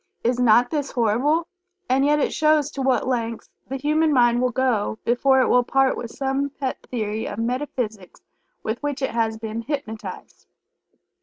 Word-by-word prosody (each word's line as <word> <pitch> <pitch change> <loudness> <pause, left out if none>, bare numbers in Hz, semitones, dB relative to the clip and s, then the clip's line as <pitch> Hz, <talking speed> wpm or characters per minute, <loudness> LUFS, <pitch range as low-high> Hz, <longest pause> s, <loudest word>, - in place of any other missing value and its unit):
Is 245 +1 +1
not 245 0 +4
this 290 -3 -2
horrible? 260 +8 +2 0.4
And 265 +2 +2
yet 295 +1 +3
it 295 - 0
shows 305 -1 +2
to 275 - -5
what 260 -1 +1
lengths 230 -3 -3 0.2
the 270 - -3
human 305 +3 +2
mind 240 -3 +4
will 250 - +2
go 245 -4 0
before 265 +3 +3
it - - +2
will 250 - +4
part 270 +2 +2
with 235 - -6
some 270 +2 -1
pet 270 -1 -4
theory 220 -2 -3
of 205 - -6
metaphysics 230 -5 -3 0.4
with 220 +3 -3
which 285 -2 -3
it - - 0
has 225 -1 0
been 220 0 -5
hypnotized. 230 -5 -6
255 Hz, 170 wpm, -23 LUFS, 230-275 Hz, 0.4 s, not